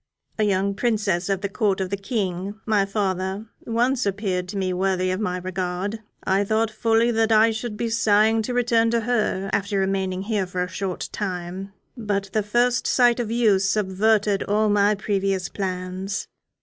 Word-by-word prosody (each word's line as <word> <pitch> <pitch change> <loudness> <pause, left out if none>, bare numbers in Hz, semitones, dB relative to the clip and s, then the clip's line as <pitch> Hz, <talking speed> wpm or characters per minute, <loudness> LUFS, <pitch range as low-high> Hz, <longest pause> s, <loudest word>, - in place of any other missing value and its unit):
A - - +3
young 200 0 +1
princess 205 -5 0
of 195 -1 0
the 200 - -1
Court 200 -1 0
of 190 -1 -2
the - - +1
King, 195 -2 -3
my 210 -3 +2
father, 195 0 -2 0.2
once 240 +2 +1
appeared 190 -3 -1
to 200 +2 -5
me 185 -1 0
worthy 185 0 0
of 185 - -2
my 180 -4 -1
regard. 185 +3 -3 0.2
I 195 +1 +2
thought 220 +2 +1
fully 225 +1 +2
that 225 -1 +1
I 220 +1 +5
should 220 -1 -4
be 235 +1 -1
sighing 220 0 +3
to 245 +3 -3
return 230 -2 +3
to 235 0 +1
her 215 -4 0
after 200 0 0
remaining 190 -1 -1
here 205 -3 -1
for 180 0 -2
a - - -3
short 185 0 -4
time; 185 0 -4 0.2
but 200 -4 -2
the 215 - +2
first 240 +4 +1
sight 245 -1 +4
of 235 -3 -2
you 225 -4 +3
subverted 200 +1 +1
all 215 +1 +1
my 205 0 +3
previous 195 -3 -1
plans. 185 0 -4
200 Hz, 175 wpm, -23 LUFS, 190-220 Hz, 0.2 s, I